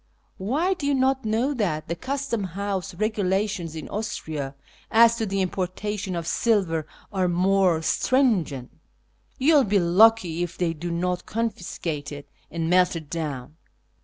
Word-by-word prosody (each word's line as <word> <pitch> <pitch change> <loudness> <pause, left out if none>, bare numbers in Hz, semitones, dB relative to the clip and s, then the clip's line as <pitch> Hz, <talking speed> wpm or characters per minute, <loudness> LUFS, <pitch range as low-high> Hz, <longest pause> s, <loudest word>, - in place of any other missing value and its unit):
Why, 290 - +1
do 300 -6 -4
you 285 - +2
not 265 -1 +1
know 230 +6 +1
that 175 - -1
the 170 - -2
Custom 265 +1 -2
House 195 0 -4
regulations 195 -4 -1
in 155 - -6
Austria 155 -10 -4 0.3
as 230 +1 +6
to 225 -2 -1
the 195 0 0
importation 190 +1 -3
of 170 -1 -3
silver 170 -5 +1 0.3
are 185 -2 +1
most 180 -2 +2
stringent? 190 - +1 0.7
You 290 +5 +4
will 290 -3 +6
be 205 -2 +2
lucky 180 -1 +4
if 175 0 -3
they 170 -2 0
do 170 +2 -5
not 180 +1 -2
confiscate 175 -9 -3
it 145 0 -8 0.2
and 165 -1 -3
melt 180 +1 +3
it 160 -3 -7
down." 150 -3 -4
185 Hz, 150 wpm, -25 LUFS, 165-220 Hz, 0.7 s, as